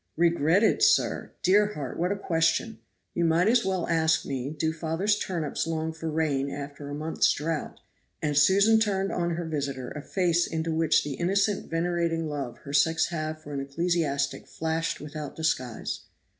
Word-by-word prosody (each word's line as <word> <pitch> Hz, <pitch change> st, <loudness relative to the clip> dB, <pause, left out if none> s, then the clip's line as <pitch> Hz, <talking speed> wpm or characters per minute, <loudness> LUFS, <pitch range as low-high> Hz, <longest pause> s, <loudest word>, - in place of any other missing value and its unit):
"Regretted, 170 Hz, -, +3 dB
sir! 425 Hz, -, +3 dB
dear 205 Hz, +3 st, +4 dB
heart, 140 Hz, -4 st, -5 dB
what 180 Hz, +3 st, +1 dB
a -, -, +1 dB
question. 165 Hz, +3 st, 0 dB, 0.3 s
You 170 Hz, -, 0 dB
might 165 Hz, +3 st, +3 dB
as 235 Hz, +1 st, +4 dB
well 190 Hz, -2 st, -1 dB
ask 160 Hz, -1 st, +2 dB
me 135 Hz, -1 st, -3 dB
do 160 Hz, +1 st, -1 dB
father's 165 Hz, +6 st, 0 dB
turnips 165 Hz, -5 st, -2 dB
long 160 Hz, 0 st, -2 dB
for 160 Hz, 0 st, -5 dB
rain 150 Hz, -3 st, 0 dB
after 145 Hz, 0 st, -7 dB
a 145 Hz, -, -4 dB
month's 155 Hz, +2 st, +1 dB
drought;" 155 Hz, +1 st, -3 dB, 0.4 s
and 150 Hz, -2 st, -1 dB
Susan 200 Hz, +8 st, +5 dB
turned 195 Hz, -3 st, 0 dB
on 170 Hz, -1 st, -1 dB
her 170 Hz, 0 st, -3 dB
visitor 140 Hz, -5 st, -3 dB
a 150 Hz, -, -6 dB
face 175 Hz, +1 st, +1 dB
into 160 Hz, 0 st, -2 dB
which 160 Hz, -1 st, +3 dB
the 145 Hz, -, -4 dB
innocent 195 Hz, +7 st, 0 dB
venerating 165 Hz, -1 st, 0 dB
love 140 Hz, -5 st, -4 dB
her 140 Hz, -, -7 dB
sex 160 Hz, +3 st, +3 dB
have 155 Hz, -2 st, -4 dB
for 145 Hz, -, -8 dB
an 140 Hz, -, -2 dB
ecclesiastic 140 Hz, -1 st, -1 dB
flashed 160 Hz, +1 st, -2 dB
without 150 Hz, 0 st, -7 dB
disguise. 130 Hz, -7 st, -2 dB
160 Hz, 170 wpm, -27 LUFS, 150-175 Hz, 0.4 s, Susan